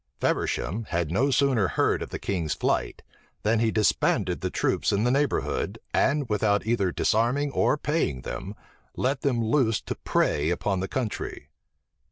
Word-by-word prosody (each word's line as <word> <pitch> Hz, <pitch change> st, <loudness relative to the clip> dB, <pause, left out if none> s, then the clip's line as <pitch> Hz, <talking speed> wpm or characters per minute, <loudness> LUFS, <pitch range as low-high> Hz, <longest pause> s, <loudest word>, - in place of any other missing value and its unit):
Feversham 110 Hz, +6 st, -1 dB
had 85 Hz, -4 st, -2 dB
no 125 Hz, +10 st, +2 dB
sooner 130 Hz, -7 st, +3 dB
heard -, -, +1 dB
of -, -, -5 dB
the -, -, -4 dB
king's 85 Hz, -8 st, -2 dB
flight, -, -, -1 dB, 0.4 s
than 110 Hz, +1 st, +2 dB
he 115 Hz, 0 st, +2 dB
disbanded 110 Hz, -1 st, +1 dB
the -, -, -1 dB
troops -, -, 0 dB
in 100 Hz, +1 st, +1 dB
the 125 Hz, -, +2 dB
neighborhood, 140 Hz, +2 st, 0 dB, 0.2 s
and 140 Hz, -1 st, +2 dB
without 105 Hz, -1 st, +1 dB
either 110 Hz, -5 st, +1 dB
disarming 125 Hz, +10 st, +1 dB
or 150 Hz, -, +2 dB
paying 145 Hz, -, -1 dB
them, 100 Hz, +10 st, -6 dB, 0.4 s
let 135 Hz, +2 st, 0 dB
them 125 Hz, -5 st, +1 dB
loose 115 Hz, -2 st, +2 dB
to -, -, -4 dB
prey 75 Hz, +2 st, 0 dB
upon 95 Hz, +2 st, 0 dB
the 95 Hz, -, -2 dB
country. 115 Hz, +2 st, -4 dB
110 Hz, 160 wpm, -26 LUFS, 100-135 Hz, 0.4 s, sooner